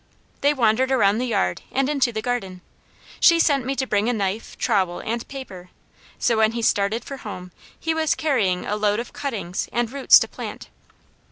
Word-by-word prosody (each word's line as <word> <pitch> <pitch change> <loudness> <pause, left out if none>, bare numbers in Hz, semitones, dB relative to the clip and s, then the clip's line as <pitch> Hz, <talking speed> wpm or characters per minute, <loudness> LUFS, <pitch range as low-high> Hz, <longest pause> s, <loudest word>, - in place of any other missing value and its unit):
They 285 - +4
wandered 255 -1 +2
around 215 -4 +3
the 250 - -1
yard 90 - 0
and 270 0 +1
into 275 -4 +1
the 220 -1 -4
garden. 195 -8 -3 0.6
She 335 -1 +6
sent 280 -6 +2
me 270 - -1
to 265 - -1
bring 215 -1 +1
a - - +1
knife, 205 0 -3
trowel, 185 -3 0
and 230 +1 -4
paper, 195 -10 -9 0.5
so 230 - +1
when 220 0 +3
he 235 -1 -3
started 205 +2 +1
for 275 - -7
home, 180 -6 -8 0.3
he 325 - -1
was 320 -1 +1
carrying 220 -13 0
a 210 - -1
load 210 0 +1
of 235 - -7
cuttings, 205 -10 -4
and 240 -1 -1
roots 275 -1 +6
to - - 0
plant. - - -8
230 Hz, 190 wpm, -23 LUFS, 205-265 Hz, 0.6 s, She